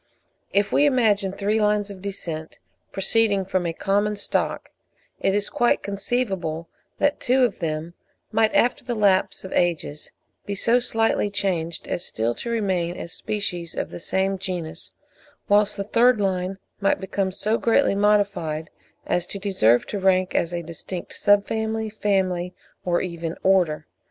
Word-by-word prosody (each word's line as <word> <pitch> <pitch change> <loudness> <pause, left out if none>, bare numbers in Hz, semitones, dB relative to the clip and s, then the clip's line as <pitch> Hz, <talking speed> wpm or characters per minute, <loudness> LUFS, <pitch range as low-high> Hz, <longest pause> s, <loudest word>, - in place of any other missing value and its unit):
If 200 +1 +2
we 290 - +4
imagine 215 -8 +2
three 210 +3 0
lines 210 -1 +1
of 190 -2 -10
descent 170 -5 -5 0.3
proceeding 200 0 +2
from 185 -2 0
a - - 0
common 205 +4 0
stock, 205 - -2 0.5
it 195 - +1
is 205 0 +1
quite 240 - +1
conceivable 195 -6 -2 0.3
that 290 0 +1
two 255 +1 +3
of 235 -6 +1
them 160 0 -3 0.4
might 220 0 +3
after 245 - +3
the 245 -1 -3
lapse 200 -3 +2
of 190 - -7
ages 165 -4 -1 0.3
be 200 - -4
so 235 +5 +3
slightly 225 -3 +1
changed 170 -5 -2
as 175 - -2
still 115 +2 -1
to 235 - -6
remain 185 -6 0
as 170 - -6
species 180 -5 -3
of - - -3
the - - -7
same 190 +2 0
genus, 175 -4 -5 0.6
whilst 210 +1 +3
the 200 - -1
third 235 +3 +4
line 190 -1 -1 0.2
might 200 -1 +2
become 190 0 -1
so 215 +4 0
greatly 235 +2 +3
modified 200 -6 +1 0.3
as 175 0 0
to - - -4
deserve 155 - +3
to 205 - -4
rank 185 -1 +2
as 170 - +1
a 170 -1 -3
distinct 170 +2 -7
Sub 205 0 +4
family, 220 0 -2
Family, 185 -4 0 0.3
or 175 -1 +1
even 170 -2 -4
Order. 175 -5 +3
195 Hz, 155 wpm, -24 LUFS, 175-210 Hz, 0.6 s, we